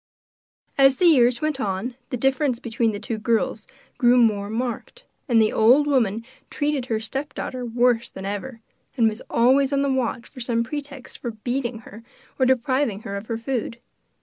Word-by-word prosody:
As 270 0 +6
the 360 - +1
years 250 -7 +5
went 305 -3 -1
on, 205 +2 -2 0.2
the 250 - -3
difference 270 +1 +1
between 230 -1 -1
the 205 - -5
two 220 0 -4
girls 220 -1 -1 0.3
grew 245 0 +5
more 210 -4 +2
marked, 245 - -4 0.2
and 235 -2 +4
the 215 -1 +3
old 250 +7 +5
woman 230 -6 +1 0.2
treated 290 -4 -1
her 225 -3 -1
stepdaughter 255 +1 -5
worse 240 0 +1
than 190 - -9
ever, 220 +4 -5 0.4
and 230 -2 +4
was 220 +2 -3
always 265 +4 +3
on 280 0 +1
the 275 -1 +1
watch 250 -2 -2
for 265 - -13
some 235 -1 0
pretext 280 +1 -7
for 240 - -4
beating 240 +1 -3
her, 215 +1 -12 0.4
or 260 - +4
depriving 255 -4 +1
her 200 -3 -6
of 200 +2 -6
her 230 - -2
food. 235 -1 -3
240 Hz, 175 wpm, -23 LUFS, 225-265 Hz, 0.4 s, As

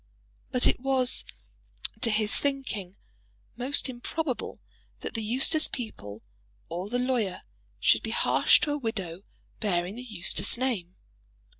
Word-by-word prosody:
But 250 - +2
it - - +4
was, 260 -1 +2 0.8
to 240 - +2
his 215 -1 +2
thinking, 255 -10 -1 0.6
most 260 +5 +2
improbable 260 +2 -3 0.4
that - - -4
the 225 - -2
Eustace 265 +8 +3
people 105 - -7 0.5
or 180 +4 -4
the 245 - 0
lawyer 245 -7 0 0.4
should - - +4
be - - -4
harsh - - +5
to 295 - +1
a 295 - -1
widow 195 -8 -3 0.4
bearing 185 -1 0
the - - -5
Eustace 200 -2 +1
name. 220 -9 -1
230 Hz, 130 wpm, -28 LUFS, 190-260 Hz, 0.8 s, harsh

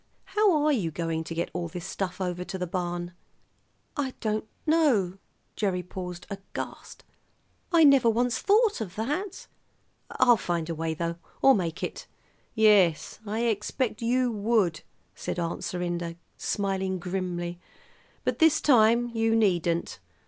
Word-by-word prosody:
How 395 -8 +4
are 305 - +4
you 205 - +1
going 165 0 -2
to 165 - -6
get 170 - -2
all 175 -1 -2
this 175 +2 -7
stuff 190 -1 -4
over 180 -1 -2
to 180 +1 -5
the 180 - -2
barn?" 175 0 -3 0.8
"I 275 -4 -2
don't 215 -1 -1 0.2
know." 255 - +2 0.4
Gerry 185 -4 -1
paused 180 -1 -7
aghast. 195 0 -7 0.7
"I 335 -2 +6
never 275 -5 +6
once 235 0 +1
thought 420 - +3
of 190 -4 -5
that. 295 - -3 0.6
I'll 240 -2 +4
find 170 -3 -2
a - - -1
way, 160 0 -2
though, 170 +1 -3 0.3
or 270 - +8
make 170 -6 -2
it." - - -5 0.5
"Yes, 205 -7 +4
I 215 +3 -1
expect 225 +1 -1
you 245 +1 +2
would," 205 -6 +1 0.3
said - - -5
Aunt 170 -1 -3
Serinda, 175 -1 -3 0.2
smiling 190 -2 -1
grimly; 175 -1 -3 0.6
"but - - -1
this 320 -2 +5
time 240 -2 +4
you 225 0 +2
needn't. 175 - +1
195 Hz, 140 wpm, -27 LUFS, 175-235 Hz, 0.8 s, or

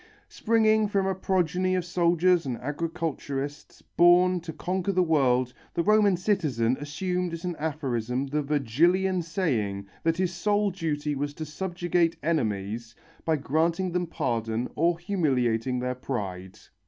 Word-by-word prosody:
Springing 220 -1 +2
from 200 -1 0
a 190 - +1
progeny 185 0 0
of 180 -2 -1
soldiers 175 0 +3
and 125 -2 -2
agriculturists, 145 -1 -4
born 180 +1 +4
to 165 -1 -7
conquer 185 +4 -2
the 185 -1 +3
world, 130 -6 +2 0.2
the 170 - +1
Roman 210 -2 +4
citizen 150 - +1
assumed 180 +4 -2
as 165 +1 -6
an 175 -1 -2
aphorism 135 -5 -2
the 150 +2 -1
Virgilian 165 +7 +2
saying 125 - -1 0.2
that 165 0 +1
his 180 -1 0
sole 205 +3 +1
duty 150 -4 -2
was 145 +1 -3
to 155 - -5
subjugate 175 +1 -1
enemies, 115 -7 -2 0.3
by 160 - +2
granting 165 +6 0
them 175 0 -1
pardon 115 -5 -2
or 170 +2 +2
humiliating 130 - 0
their 125 +1 -1
pride. 95 -8 -5
165 Hz, 140 wpm, -27 LUFS, 130-180 Hz, 0.3 s, born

